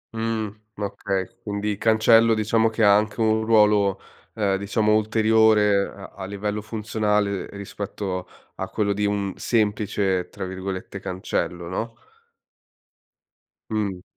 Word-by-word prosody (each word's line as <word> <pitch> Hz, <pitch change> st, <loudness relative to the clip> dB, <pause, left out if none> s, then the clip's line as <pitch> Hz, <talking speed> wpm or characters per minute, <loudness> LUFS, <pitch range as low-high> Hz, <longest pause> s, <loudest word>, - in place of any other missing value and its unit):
Mhmm, 110 Hz, -2 st, -2 dB, 0.2 s
okay. 100 Hz, -2 st, -2 dB, 0.2 s
Quindi 105 Hz, 0 st, -2 dB
cancello 115 Hz, +1 st, +5 dB
diciamo 110 Hz, +1 st, +2 dB
che 110 Hz, 0 st, -1 dB
ha 100 Hz, -1 st, +7 dB
anche 105 Hz, +2 st, 0 dB
un 110 Hz, 0 st, +2 dB
ruolo, 105 Hz, -3 st, +4 dB, 0.4 s
ehm, 100 Hz, -3 st, +1 dB
diciamo 105 Hz, +2 st, +1 dB
ulteriore 110 Hz, -2 st, +3 dB
a 100 Hz, -, -13 dB
a 95 Hz, -, -6 dB
livello 105 Hz, +2 st, -3 dB
funzionale 105 Hz, -2 st, -1 dB
rispetto 100 Hz, -2 st, -5 dB, 0.3 s
a 95 Hz, -, -4 dB
quello 100 Hz, -2 st, 0 dB
di 105 Hz, +1 st, -1 dB
un 100 Hz, -2 st, -1 dB
semplice, 105 Hz, -4 st, 0 dB
tra -, -, -6 dB
virgolette, 95 Hz, +1 st, -5 dB
cancello, 90 Hz, -2 st, -3 dB
no? 110 Hz, +6 st, -4 dB, 1.8 s
Mh. 100 Hz, -4 st, -2 dB
105 Hz, 120 wpm, -24 LUFS, 100-110 Hz, 1.8 s, ha